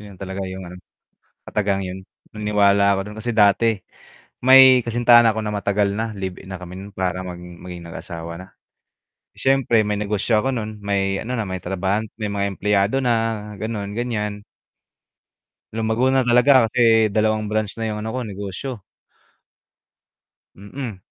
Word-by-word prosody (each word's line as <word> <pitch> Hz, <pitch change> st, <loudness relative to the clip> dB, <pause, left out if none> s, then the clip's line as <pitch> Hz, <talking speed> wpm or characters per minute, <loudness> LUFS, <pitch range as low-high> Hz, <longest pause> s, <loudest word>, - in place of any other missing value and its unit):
'Yun 100 Hz, -2 st, -12 dB
talaga 95 Hz, +1 st, -6 dB
yung 95 Hz, 0 st, -7 dB
ano, 90 Hz, +1 st, -10 dB, 0.7 s
katagang 100 Hz, -2 st, 0 dB
'yun, 95 Hz, 0 st, -6 dB, 0.3 s
naniniwala 100 Hz, -1 st, +3 dB
ako 100 Hz, -, 0 dB
dun 105 Hz, -, -10 dB
kasi 120 Hz, +2 st, -3 dB
dati 110 Hz, 0 st, +3 dB, 0.6 s
may 130 Hz, -1 st, +8 dB
kasintahan 120 Hz, 0 st, +5 dB
na 115 Hz, -, +4 dB
'ko 110 Hz, -, -3 dB
na 110 Hz, -, -4 dB
matagal 100 Hz, 0 st, +1 dB
na, 110 Hz, +1 st, -2 dB
live 95 Hz, -3 st, -5 dB
in 95 Hz, -, -9 dB
na 90 Hz, -, -6 dB
kami 90 Hz, 0 st, -9 dB
nun, 100 Hz, +2 st, -9 dB
para 95 Hz, -1 st, -2 dB
mang 90 Hz, -1 st, -7 dB
maging 90 Hz, 0 st, -10 dB
mag-asawa 85 Hz, -1 st, -7 dB
na. 90 Hz, +2 st, -10 dB, 0.9 s
S'yempre, 135 Hz, -4 st, +2 dB
may 105 Hz, -, 0 dB
negosyo 105 Hz, +2 st, +1 dB
ako 135 Hz, -, 0 dB
nun, 110 Hz, -4 st, -4 dB
may 95 Hz, -1 st, -1 dB
ano 125 Hz, +1 st, -3 dB
na, 105 Hz, -, -2 dB
may 95 Hz, -1 st, -5 dB
trabahan 95 Hz, +3 st, -1 dB, 0.2 s
may 105 Hz, -, -2 dB
mga 100 Hz, -1 st, -1 dB
empleyado 105 Hz, +5 st, +1 dB
na, 125 Hz, -, +2 dB, 0.5 s
gano'n, 105 Hz, -2 st, -4 dB
gan'yan. 105 Hz, -4 st, -3 dB, 1.3 s
Lumago 110 Hz, +3 st, 0 dB
na 135 Hz, -, +4 dB
talaga 125 Hz, +1 st, +5 dB
kasi 115 Hz, -2 st, +4 dB
2 110 Hz, 0 st, 0 dB
branch 110 Hz, -1 st, -1 dB
na 110 Hz, -, -1 dB
'yung 105 Hz, 0 st, -4 dB
ano 110 Hz, -, -4 dB
ko, 130 Hz, -, -2 dB
negosyo. 105 Hz, +2 st, -6 dB, 1.7 s
Mm, 105 Hz, +2 st, -7 dB
105 Hz, 160 wpm, -21 LUFS, 95-115 Hz, 1.7 s, may